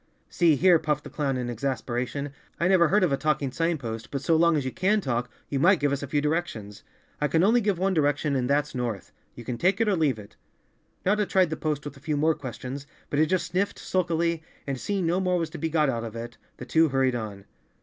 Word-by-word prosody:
"See 170 -4 +4
here," 175 +2 +5
puffed 150 -1 -1
the - - -10
clown 140 -3 -1
in 125 -1 -3
exasperation, 130 +3 -3 0.3
"I 170 - +2
never 185 -3 +5
heard 200 +4 +3
of 175 - +2
a 140 - +2
talking 150 -3 0
sign 165 +4 0
post, 115 -4 -6
but 140 -1 -4
so 165 +3 +3
long 170 0 +4
as 140 - -2
you 130 - -2
can 195 +6 +2
talk, 120 - -2 0.2
you 140 - -2
might 180 +4 +5
give 145 -1 +1
us 140 - -1
a 140 - -4
few 145 +2 0
directions." 145 -10 -3 0.4
"I 150 - +2
only 220 +8 +4
give 205 -4 +1
one 190 +2 +1
direction 145 -2 +1
and 125 -1 0
that's 145 +1 +1
north. 120 -6 -4 0.2
You 120 - -9
can 120 -1 -4
take 185 +4 +2
it, 225 - +2
or 205 - +3
leave 150 -8 +1
it." 105 -1 -13 0.7
Notta 205 +1 +2
tried 185 -4 +3
the - - 0
post 150 -2 -2
with 145 -1 -7
a - - -14
few 150 +1 -2
more 160 +2 +3
questions, 130 +1 -7 0.2
but 145 - +1
it 155 - +4
just 185 0 0
sniffed 185 +3 -1
sulkily, 170 -2 0 0.2
and 135 -2 -3
seeing 195 +1 -1
no 175 +3 +1
more 180 -1 +1
was 165 -2 -2
to - - -7
be 165 - -1
got 155 -2 +2
out 120 -3 -1
of 115 -1 -7
it, 115 0 -6 0.2
the - - -8
two 160 -1 +3
hurried 135 -1 +2
on. 105 -4 -5
150 Hz, 245 wpm, -26 LUFS, 130-170 Hz, 0.7 s, here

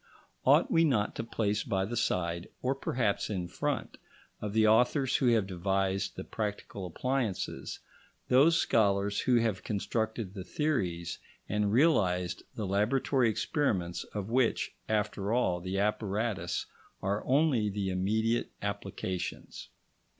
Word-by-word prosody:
Ought - - +5
we 165 - +5
not 120 -10 +2
to - - -4
place 105 -3 -1
by 95 -3 0
the 115 +4 -4
side, 85 -5 -1
or 130 +1 +2
perhaps 120 -6 -1
in 90 -4 -2
front, 85 - -3 0.4
of 105 - -3
the 110 0 +4
authors 125 +5 +4
who 130 - +1
have 115 -4 +4
devised 95 +1 -1
the - - -5
practical 105 -3 -4
appliances, 120 +1 -2 0.5
those 150 +6 +5
scholars 100 -5 +2
who 125 - +2
have 115 -5 +1
constructed 110 -1 -2
the 95 -3 -6
theories 90 - -1 0.3
and 105 0 0
realised 90 - +2
the 110 - -3
laboratory 115 +6 +2
experiments 100 - -1
of 105 -2 -5
which, 125 -1 +1 0.2
after 105 -1 0
all, 90 -8 +2
the 95 +2 -3
apparatus 100 -3 -1 0.4
are 100 +2 0
only 130 -6 +3
the 100 -1 -2
immediate 110 +5 +1
applications? 90 -1 -4
105 Hz, 130 wpm, -30 LUFS, 95-120 Hz, 0.5 s, Ought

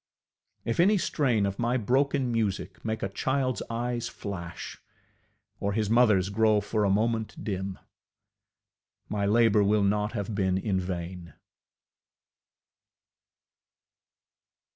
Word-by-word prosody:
If 115 - -2
any 200 +5 +5
strain 125 - +1
of 100 0 -3
my 120 +2 +1
ŌĆ£broken 130 +2 +1
musicŌĆØ 110 -4 -2
make 110 0 -2
a 100 - -1
childŌĆÖs 130 +5 -1
eyes 120 0 -2
flash, 95 -7 -7 0.8
or 100 0 -1
his 110 -1 0
motherŌĆÖs 105 -5 +4
grow 110 0 +4
for 105 +1 -1
a - - +2
moment 110 +2 0
dim, 95 -2 -3 1.3
my 100 -1 0
labour 110 -1 +4
will 105 +1 +3
not 105 +1 +1
have 100 +1 -3
been 95 -2 +1
in 95 -1 0
vain. 90 -1 -5
105 Hz, 115 wpm, -28 LUFS, 100-115 Hz, 1.3 s, any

